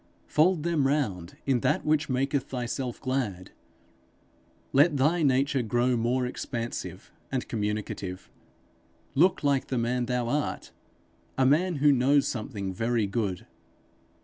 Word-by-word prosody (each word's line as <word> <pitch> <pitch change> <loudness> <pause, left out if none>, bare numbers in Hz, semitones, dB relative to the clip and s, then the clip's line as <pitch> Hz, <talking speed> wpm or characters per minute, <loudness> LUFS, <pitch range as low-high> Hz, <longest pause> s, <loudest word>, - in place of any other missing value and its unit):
Fold 160 +1 +2
them 160 -5 +1
round 100 - -1
in 135 -3 +2
that - - 0
which 155 0 +1
maketh 135 +1 0
thyself 125 0 -4
glad. 125 -9 -3 1.2
Let 145 +2 +5
thy 155 +6 +2
nature 135 -1 +2
grow 120 +2 +1
more 120 +2 +1
expansive 120 -1 -5 0.2
and 130 -2 -2
communicative. 105 -4 -3 0.9
Look 175 +5 +3
like 140 -2 +1
the 130 - -2
man 120 +1 0
thou 125 -1 -1
art 145 +4 -2 0.7
a 130 - +3
man 165 +6 +3
who 145 +1 +4
knows 140 +2 +3
something 105 -5 -4
very 115 +2 0
good. 100 -3 -2
130 Hz, 125 wpm, -27 LUFS, 115-145 Hz, 1.2 s, Let